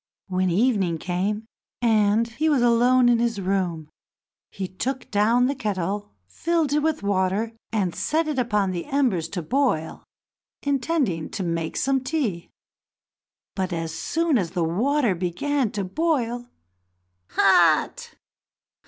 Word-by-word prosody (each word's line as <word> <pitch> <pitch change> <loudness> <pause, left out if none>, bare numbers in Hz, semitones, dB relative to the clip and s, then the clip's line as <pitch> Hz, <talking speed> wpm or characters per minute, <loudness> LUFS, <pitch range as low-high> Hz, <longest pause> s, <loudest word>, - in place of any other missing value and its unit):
When 185 -1 0
evening 195 -3 +1
came, 190 +6 -2 0.3
and 220 -1 +3
he 295 +7 -1
was 275 -5 +3
alone 245 +1 +4
in 240 -1 +4
his 235 -3 0
room, 180 -5 -1 0.6
he 195 -2 -5
took 250 +8 -4
down 225 +4 +3
the 270 - +1
kettle, 205 -4 -3
filled 320 - -1
it 300 - +3
with 310 -6 -1
water, 200 +3 0 0.2
and 195 -6 0
set 315 - 0
it 295 -4 -1
upon 210 -5 +1
the 175 -2 -4
embers 250 - 0
to 175 -2 -4
boil, 245 - 0 0.6
intending 275 - 0
to 195 - -4
make 165 -2 -2
some 270 -1 +1
tea. 255 - -2 1.0
But, 190 -1 -2
as 165 -1 -3
soon 325 - 0
as 175 -4 -2
the 175 - 0
water 235 - +1
began 200 +10 -1
to 200 - -2
boil, 245 - -1 0.8
"Hot! - - +3
215 Hz, 135 wpm, -24 LUFS, 185-265 Hz, 1.0 s, alone